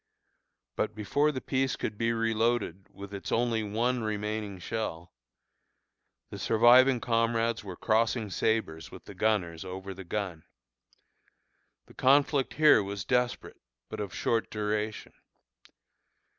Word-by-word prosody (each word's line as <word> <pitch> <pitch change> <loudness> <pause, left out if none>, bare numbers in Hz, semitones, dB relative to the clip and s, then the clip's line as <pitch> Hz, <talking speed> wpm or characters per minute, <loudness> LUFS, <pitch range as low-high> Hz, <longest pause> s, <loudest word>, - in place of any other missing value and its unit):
But 105 - -2
before 145 +9 +1
the 130 - -4
piece 130 -1 0
could 110 - -4
be 115 +2 0
reloaded 115 -4 0
with 100 0 -10
its 100 - -6
only 115 -1 +1
one 115 +4 -1
remaining 105 -1 -3
shell, 90 -3 -5 1.2
the - - -7
surviving 120 +3 +5
comrades 115 -1 0
were 95 -3 -7
crossing 110 +1 0
sabres 90 -7 -1
with - - -12
the - - -10
gunners 90 -7 0
over 95 +1 -7
the 95 +1 -9
gun. 90 -3 -4 1.4
The - - -18
conflict 140 +1 +3
here 155 -8 +6
was 100 -1 -5
desperate, 125 0 -1 0.3
but - - -6
of 100 -3 -4
short 115 +5 -1
duration. 105 0 -3
110 Hz, 125 wpm, -29 LUFS, 100-120 Hz, 1.4 s, here